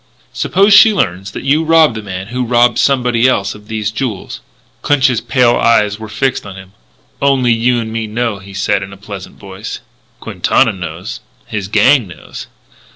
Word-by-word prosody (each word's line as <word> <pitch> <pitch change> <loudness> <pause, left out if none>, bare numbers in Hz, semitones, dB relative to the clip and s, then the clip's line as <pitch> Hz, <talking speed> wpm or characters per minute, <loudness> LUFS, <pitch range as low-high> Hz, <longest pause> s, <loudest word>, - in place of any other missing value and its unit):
"Suppose 200 +3 +2
she 215 +1 +7
learns 95 - -1
that - - -8
you 145 +4 +2
robbed 160 -4 +4
the 110 - -6
man 95 -1 -7
who 125 +1 -2
robbed 120 -1 +2
somebody 125 -3 +2
else 100 -6 0
of 105 0 -15
these 110 -1 -3
jewels." 110 -3 -5 0.4
Clinch's 130 -5 +2
pale 120 0 +2
eyes 105 -2 +2
were 110 -1 -8
fixed 130 +5 -1
on 100 -2 -9
him: 95 -1 -12 0.5
"Only 130 -4 +3
you 120 +2 +1
and 110 -1 -5
me 115 -1 -3
know," 110 -1 -2
he 100 0 -13
said 100 0 0
in 100 - -7
his 100 -1 -13
pleasant 100 -2 -9
voice. 100 +2 -8 0.4
"Quintana - - +1
knows. 85 -2 -7 0.3
His 105 -3 -5
gang 115 +3 +3
knows." 90 - -10
110 Hz, 175 wpm, -14 LUFS, 100-125 Hz, 0.5 s, she